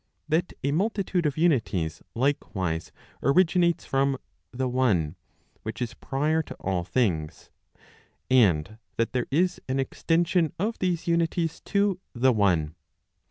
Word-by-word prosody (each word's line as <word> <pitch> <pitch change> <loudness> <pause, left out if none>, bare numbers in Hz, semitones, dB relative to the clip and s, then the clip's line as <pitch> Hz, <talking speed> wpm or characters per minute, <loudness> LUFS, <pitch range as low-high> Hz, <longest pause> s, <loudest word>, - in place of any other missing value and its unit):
That 160 +4 0
a 140 - +1
multitude 190 -1 0
of 145 - -3
unities 110 - +1
likewise 95 - -1 0.3
originates 170 +2 +3
from 135 0 +1 0.3
the 130 +1 -2
one 105 -12 +1 0.5
which - - -6
is 120 -1 -3
prior 150 +6 0
to - - -9
all 95 -2 -2
things; 85 -7 -1 0.8
and 110 -5 +3 0.2
that 115 - 0
there 125 -1 0
is 175 +6 +1
an 135 +1 0
extension 165 +4 +1
of 215 +6 -2
these 180 -3 0
unities 170 -1 0
to 200 -2 +1
the 130 +1 +3
one. 90 -8 +2
135 Hz, 125 wpm, -26 LUFS, 110-170 Hz, 0.8 s, originates